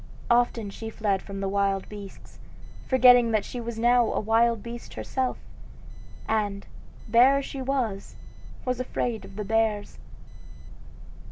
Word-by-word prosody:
Often 235 -3 +2
she 225 +2 -7
fled 205 -3 -1
from 195 -1 -7
the 195 - -1
wild 195 0 0
beasts, 205 -2 -11 0.5
forgetting 250 -2 +6
that 215 -2 +1
she 245 - -6
was 235 -1 -6
now 240 +1 +3
a - - 0
wild 225 0 +2
beast 235 0 -8
herself; 260 -1 -2 0.9
and, 205 -2 -1 0.4
bear 245 +5 +5
as 275 - -2
she 270 - -6
was, 250 -7 -2 0.5
was 255 -1 -1
afraid 245 -2 -3
of - - -13
the 210 0 -4
bears. 220 -1 0
225 Hz, 140 wpm, -26 LUFS, 205-245 Hz, 0.9 s, forgetting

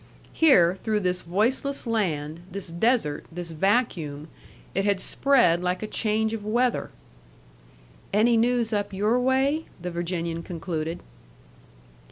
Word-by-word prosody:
Here, 180 - +5
through 215 -2 0
this 180 -1 0
voiceless 245 +11 0
land, 165 -9 -1
this 195 -1 -5
desert, 170 - 0
this 170 0 -6
vacuum, 165 - 0 0.4
it 195 - 0
had 200 -1 +1
spread 235 -10 +3
like 180 +2 -1
a - - -3
change 220 0 0
of 220 -2 -4
weather. 240 +4 0 1.2
"Any 225 +3 +4
news 235 0 +1
up 205 -1 -1
your 210 +5 +1
way?" 265 +5 +1
the 180 +1 -5
Virginian 170 -1 -3
concluded. 165 -1 -4
200 Hz, 125 wpm, -25 LUFS, 170-235 Hz, 1.2 s, Here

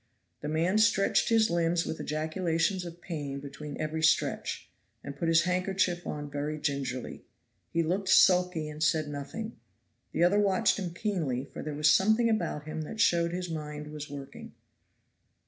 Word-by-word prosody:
The 150 - -4
man 165 +7 +1
stretched 205 -3 +3
his 225 -4 +4
limbs 170 0 +1
with 160 - -4
ejaculations 165 +4 -1
of 170 0 -9
pain 145 -6 -5
between 145 +1 -8
every 155 +1 -2
stretch, 160 - +1 0.4
and 140 - -7
put 165 +4 -2
his 165 0 +5
handkerchief 180 -1 0
on 145 -1 -4
very 145 +2 -3
gingerly. 135 -4 -3 0.5
He 165 - +1
looked 185 +4 -1
sulky 180 -5 +4
and 150 0 -8
said 155 -1 +2
nothing. 145 +11 -6 0.5
The - - +1
other 190 +4 +4
watched 200 -1 +2
him 180 -3 -3
keenly, 160 - -1
for 135 - -9
there 150 -1 -5
was 150 0 +4
something 220 +4 +4
about 170 -8 -1
him 155 +1 -5
that 215 +8 -7
showed 170 -5 +3
his 180 -1 -4
mind 150 -1 -6
was 150 -1 -7
working. 140 -1 -9
165 Hz, 165 wpm, -29 LUFS, 150-185 Hz, 0.5 s, his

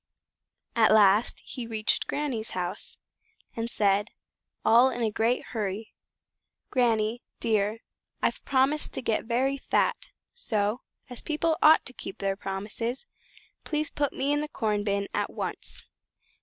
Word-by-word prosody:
At 225 -2 +5
last 210 +1 +5
he 245 -3 -6
reached 220 -1 +1
his - - -3
Granny's 260 -7 -2
house, 180 +2 -4 0.6
and 230 0 -2
said, 205 -3 +2 0.6
all 240 +3 +7
in 240 -2 -3
a 220 - +1
great 225 +4 +1
hurry, 215 -1 -3 0.8
"Granny, 230 -2 +2 0.2
dear, 215 0 +1 0.4
I've - - -1
promised 275 +3 +2
to - - -4
get 220 -1 0
very 260 +4 +1
fat; - - 0 0.2
so, 215 - -1 0.3
as 245 -2 -6
people 315 +1 0
ought 310 +1 +7
to 255 - -6
keep 195 - -7
their 195 0 -1
promises, 210 - -4 0.6
please 305 -1 -1
put 285 -2 0
me 275 +2 -1
into 295 +1 0
the - - -8
corn 210 -7 -1
bin 200 -1 0
at - - 0
once." - - -4
230 Hz, 145 wpm, -28 LUFS, 210-265 Hz, 0.8 s, all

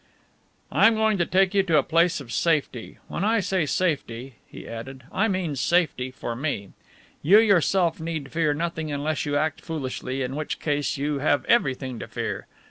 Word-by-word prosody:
"I - - +6
am 225 - +3
going 220 -2 +2
to 175 - +1
take 190 0 +3
you 200 - +4
to 170 -5 +2
a - - +4
place 170 +1 +2
of 125 -5 -10
safety. 150 -8 0
When 170 - -3
I 225 +2 +3
say 185 -4 0
safety," 135 -8 -1
he - - -11
added, 130 +3 -8
"I 210 +4 +1
mean 185 -7 -1
safety 155 -3 +1
for 120 -2 -5
me. 120 -7 -3 0.5
You 190 +8 +6
yourself 190 -5 +3
need 160 -4 -4
fear 155 -3 +1
nothing 160 -1 -3
unless 145 +1 -2
you 145 0 +1
act 155 0 -1
foolishly, 135 -4 -4
in 130 +2 -4
which 155 0 -4
case 145 -1 -1
you 145 +1 -1
have 145 0 +1
everything 130 - +1
to - - -6
fear. - - -4
155 Hz, 185 wpm, -25 LUFS, 135-180 Hz, 0.5 s, I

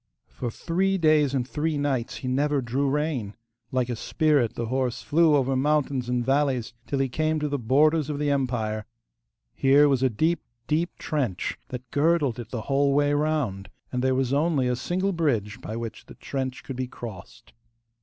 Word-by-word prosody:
For 120 - -4
three 190 - 0
days 155 -4 +3
and 125 -2 -1
three 155 +2 -1
nights 135 -5 -1
he 130 - -6
never 145 +3 +1
drew 135 +3 0
rein. 140 -8 -1 0.4
Like 130 -2 +1
a 120 - -2
spirit 145 -1 +1
the 115 - -2
horse 130 +1 -1
flew 160 0 +4
over 135 -1 +2
mountains 135 -2 +1
and 125 -1 0
valleys 135 -4 +1
till 140 - -1
he 135 0 +1
came 155 +4 0
to 150 - -1
the 145 -1 -2
borders 150 +5 +3
of 150 - -2
the 145 0 0
empire. 115 -6 -1 0.7
Here 140 +2 +5
was 135 -3 +2
a 130 - +3
deep, 160 +9 +1 0.2
deep 165 +6 -1
trench 130 - -2
that 125 -1 -8
girdled 145 -5 +2
it 115 -2 -7
the 120 -2 -4
whole 140 +3 +2
way 145 0 +3
round, 145 -10 -1 0.2
and 125 0 -1
there 130 0 +2
was 130 0 0
only 145 -3 +2
a 125 - +1
single 185 +9 -1
bridge 120 - -1
by 110 - -5
which 115 -1 -6
the - - -12
trench 130 -2 -4
could 135 - -6
be 130 0 -2
crossed. 115 -1 -10
135 Hz, 185 wpm, -26 LUFS, 125-150 Hz, 0.7 s, Here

